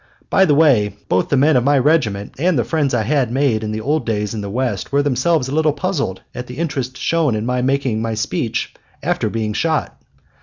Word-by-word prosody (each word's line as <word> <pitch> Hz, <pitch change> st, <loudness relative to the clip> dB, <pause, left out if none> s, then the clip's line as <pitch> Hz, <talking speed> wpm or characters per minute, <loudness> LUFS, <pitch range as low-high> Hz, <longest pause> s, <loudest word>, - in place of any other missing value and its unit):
By 190 Hz, -, +5 dB
the 150 Hz, -5 st, +3 dB
way, 130 Hz, -10 st, +3 dB
both 90 Hz, -, +1 dB
the 140 Hz, -, +2 dB
men 150 Hz, +4 st, +4 dB
of 125 Hz, -, +3 dB
my 140 Hz, +2 st, +3 dB
regiment 125 Hz, -8 st, +1 dB
and 175 Hz, 0 st, +2 dB
the 120 Hz, -, +2 dB
friends 145 Hz, +3 st, 0 dB
I 110 Hz, -, +1 dB
had 130 Hz, -1 st, +1 dB
made 130 Hz, -4 st, +1 dB
in 110 Hz, -, -3 dB
the 110 Hz, 0 st, -3 dB
old 150 Hz, +7 st, 0 dB
days 105 Hz, -2 st, -2 dB
in 110 Hz, -, -4 dB
the 100 Hz, -, -5 dB
West 125 Hz, +4 st, -2 dB
were 140 Hz, +1 st, +2 dB
themselves 140 Hz, +1 st, +1 dB
a 135 Hz, -, -4 dB
little 155 Hz, -1 st, +2 dB
puzzled 150 Hz, -, -2 dB
at 125 Hz, 0 st, -6 dB
the 125 Hz, -, -9 dB
interest 140 Hz, -6 st, -3 dB
shown 160 Hz, -8 st, +1 dB
in 105 Hz, +1 st, -2 dB
my 125 Hz, 0 st, 0 dB
making 130 Hz, -4 st, 0 dB
my 115 Hz, -1 st, -2 dB
speech 110 Hz, -, -2 dB, 0.3 s
after -, -, 0 dB
being 110 Hz, -2 st, -2 dB
shot. 160 Hz, +6 st, -1 dB
130 Hz, 225 wpm, -19 LUFS, 110-150 Hz, 0.3 s, By